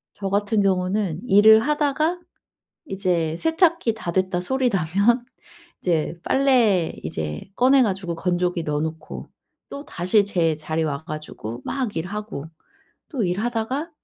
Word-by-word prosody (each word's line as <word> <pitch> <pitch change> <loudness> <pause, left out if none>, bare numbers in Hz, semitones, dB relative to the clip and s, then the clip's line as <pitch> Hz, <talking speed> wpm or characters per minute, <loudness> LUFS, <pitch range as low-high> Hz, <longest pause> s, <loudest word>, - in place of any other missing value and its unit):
저 195 -1 -4
같은 205 +1 +1
경우는 185 -2 0
일을 215 +3 +7
하다가 300 +5 0 0.7
이제 175 - -1
세탁기 325 - +2
다 175 -6 -5
됐다 185 -1 0
소리 260 +6 0
나면 200 +6 +2 0.6
이제 170 -1 0
빨래 240 -11 +3
이제 75 -1 -4
꺼내 260 +2 +5
가지고 190 -6 -1
건조기 175 0 -1
넣어 150 0 -1
놓고 160 0 -6 0.4
또다시 205 - 0
제 165 -6 +1
자리 155 +1 -2
와 150 0 -3
가지고 155 -8 -7
막 255 -6 -3
일하고 190 -3 -5 0.6
또 255 - -2
일하다가 230 - -2
195 Hz, 255 characters per minute, -23 LUFS, 165-240 Hz, 0.7 s, 일을